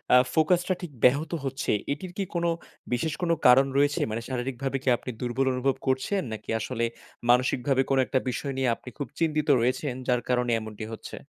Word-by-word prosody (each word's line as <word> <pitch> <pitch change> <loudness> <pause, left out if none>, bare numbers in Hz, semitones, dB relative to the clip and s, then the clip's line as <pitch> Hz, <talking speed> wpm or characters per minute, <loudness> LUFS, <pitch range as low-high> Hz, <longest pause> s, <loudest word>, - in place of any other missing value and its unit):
আ - - +9 0.2
focus 170 +2 +3
টা 185 - +2
ঠিক 170 -4 -6
ব্যাহত 145 +6 +4
হচ্ছে 135 0 -2 0.2
এটির 175 +5 -4
কি 200 - 0
কোনো 170 0 +1 0.4
বিশেষ 150 +5 0
কোনো 170 -1 +2
কারণ 130 +2 +7
রয়েছে? 145 0 +3
মানে 115 +2 -3
শারীরিকভাবে 130 +2 -2
কি 130 - +2
আপনি - - -8
দুর্বল 125 +2 0
অনুভব 130 +1 +1
করছেন? 130 +10 +1
নাকি 110 - -8
আসলে 115 +1 -2 0.5
মানসিকভাবে 130 +2 +3
কোনো 135 -1 +3
একটা 130 - +1
বিষয় 135 +3 -3
নিয়ে 130 -2 +2
আপনি 125 - -11
খুব 145 -4 -3
চিন্তিত 155 -2 +1
রয়েছেন 130 +2 0
যার 125 -1 +2
কারণে 125 -1 +2
এমনটি 110 0 -7
হচ্ছে? - - -8
135 Hz, 185 wpm, -27 LUFS, 125-150 Hz, 0.5 s, আ